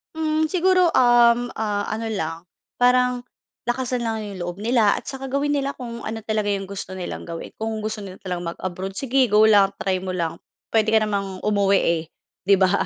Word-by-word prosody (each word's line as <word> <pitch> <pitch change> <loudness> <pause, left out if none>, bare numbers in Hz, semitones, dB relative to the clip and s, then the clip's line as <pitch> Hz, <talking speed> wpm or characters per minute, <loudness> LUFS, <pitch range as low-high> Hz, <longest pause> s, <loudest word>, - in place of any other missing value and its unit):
Hmm, 315 0 +1
siguro, 365 0 +3
um, 240 -1 +5
ah, 205 -2 -1
ano 220 +1 -3
lang, 165 -6 -3 0.3
parang 250 0 +3 0.4
lakasan 245 0 -1
lang 225 -1 -2
'yong 195 -4 -6
loob 175 +3 -6
nila 225 -3 +3
at - - -5
saka 270 -1 -6
gawin 280 +2 -1
nila 275 0 -1
kung 235 -2 -7
ano 225 0 -4
talaga 215 -1 0
'yong 195 -1 -4
gusto 190 -1 -6
nilang 185 -1 -6
gawin. 165 -1 -6
Kung 220 0 -3
gusto 215 -1 -4
nila 185 -1 -5
mag-abroad 185 +2 -5
sige, 265 +4 +2
go 210 -2 +4
lang, 200 -2 +5
try 190 -1 +1
mo 185 0 -4
lang, 170 -3 -2 0.3
puwede 220 -1 +2
ka 220 - +5
namang 200 -3 -2
umuwi 200 -2 +3
eh, 170 -1 +1 0.4
'di 200 - +6
ba? 190 +1 +3
215 Hz, 185 wpm, -23 LUFS, 195-245 Hz, 0.4 s, di